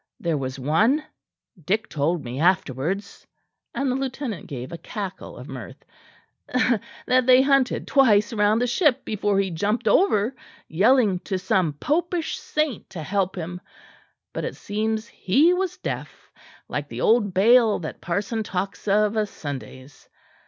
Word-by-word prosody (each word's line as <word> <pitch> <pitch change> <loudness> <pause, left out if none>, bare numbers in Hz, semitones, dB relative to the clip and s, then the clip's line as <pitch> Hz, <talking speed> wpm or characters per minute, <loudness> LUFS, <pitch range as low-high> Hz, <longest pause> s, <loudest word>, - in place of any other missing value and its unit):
There 170 -2 0
was 135 -2 -3
one, 210 - +2 0.6
Dick 210 +8 0
told 155 +2 -1
me 125 +2 -5
afterwards," 175 +2 0 0.5
and 275 -1 0
the - - 0
lieutenant 265 - -4
gave 130 -1 -6
a 170 - -5
cackle 195 -4 -7
of - - -10
mirth, - - -9 1.2
"that 255 0 +3
they 255 0 +7
hunted 275 -2 +2
twice 215 -6 +4
round 210 0 +3
the - - +2
ship 265 +1 +2
before 205 -1 0
he 195 -1 0
jumped 210 +8 -1
over 255 - +3 0.3
yelling 205 +2 +3
to 190 +1 -3
some 185 -3 +1
popish 330 - -1
saint 305 -6 -2
to 165 -4 -7
help 195 +2 -1
him; 180 0 -6 0.7
but - - -4
it - - -4
seems 220 +1 -2
he 290 - +3
was 370 -1 -2
deaf, - - -6 0.4
like - - -4
the - - -6
old 220 -3 +3
Baal 225 +2 +5
that 160 - -7
parson 200 +6 -2
tells 195 0 -4
of 210 +1 +3
o' 215 -1 +2
Sundays. 140 -5 -9
205 Hz, 145 wpm, -24 LUFS, 175-250 Hz, 1.2 s, they